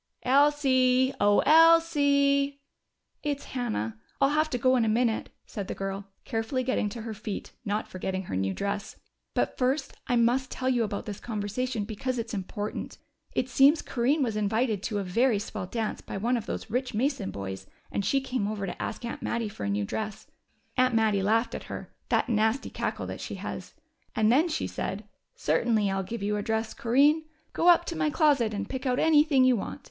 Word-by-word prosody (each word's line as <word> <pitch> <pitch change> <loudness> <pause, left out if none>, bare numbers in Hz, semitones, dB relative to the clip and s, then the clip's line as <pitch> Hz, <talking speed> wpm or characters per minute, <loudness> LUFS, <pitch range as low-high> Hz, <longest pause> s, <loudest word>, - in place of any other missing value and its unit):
"Elsie! 260 -2 +4
Oh, 205 0 +4
Elsie!" 285 -3 +5 0.6
"It's 290 -2 -2
Hannah. 110 - -3 0.2
I'll 275 - +4
have 310 +1 +2
to 250 - -1
go 255 +2 +3
in 245 - +3
a - - +1
minute," 230 0 +1 0.2
said 200 -3 -6
the - - -4
girl, 195 0 -4 0.2
carefully 225 +2 -1
getting 250 -4 0
to 230 +1 -7
her 225 -1 -5
feet, 205 -1 -6
not 210 +1 -1
forgetting 190 +1 -4
her 95 - -5
new 95 +1 0
dress. 200 - -3 0.4
"But - - 0
first 270 +2 0
I 245 - +2
must 240 +3 +2
tell 255 - -3
you 245 -2 +2
about 205 -2 -3
this 205 -2 -6
conversation, 220 +2 -3
because 250 +4 -3
it's 230 -1 -4
important. 205 +1 -4 0.4
It 250 - 0
seems 275 +4 +5
Corinne 270 +5 +1
was 225 -4 -1
invited 215 0 0
to 210 0 -2
a 200 - -1
very 225 +5 +2
swell 205 -2 -5
dance 220 +2 -3
by - - -6
one 235 +5 +1
of 230 -2 -3
those - - -5
rich 250 0 -1
Mason 255 -3 0
boys, 95 -1 -6 0.2
and 200 - -1
she 275 +7 +2
came 255 -6 -2
over 205 -2 -3
to 180 - -6
ask - - -4
Aunt 235 - -5
Mattie 230 -2 -2
for 105 - -6
a - - -1
new 100 0 0
dress. 215 - -4 0.5
Aunt 255 -1 +3
Mattie 215 -3 +3
laughed 225 +4 +1
at - - -6
her - - -8 0.2
that - - +2
nasty 220 +2 +1
cackle - - -3
that - - -6
she - - -5
has. - - -7 0.4
And 220 0 +3
then 305 +8 +4
she 320 - -1
said, 200 +2 -4 0.3
'Certainly 210 +5 +1
I'll 195 0 0
give 200 +3 -5
you 210 +1 0
a - - -1
dress, 220 +1 -1
Corinne. 285 +7 +3 0.3
Go 340 - +1
up 345 0 +6
to 335 - -4
my 315 -1 +1
closet 290 -7 +3
and 205 -1 -3
pick 260 +2 -4
out 250 0 +1
anything 300 -3 +4
you 255 -1 +5
want. 230 - -5
235 Hz, 200 wpm, -28 LUFS, 205-265 Hz, 0.6 s, up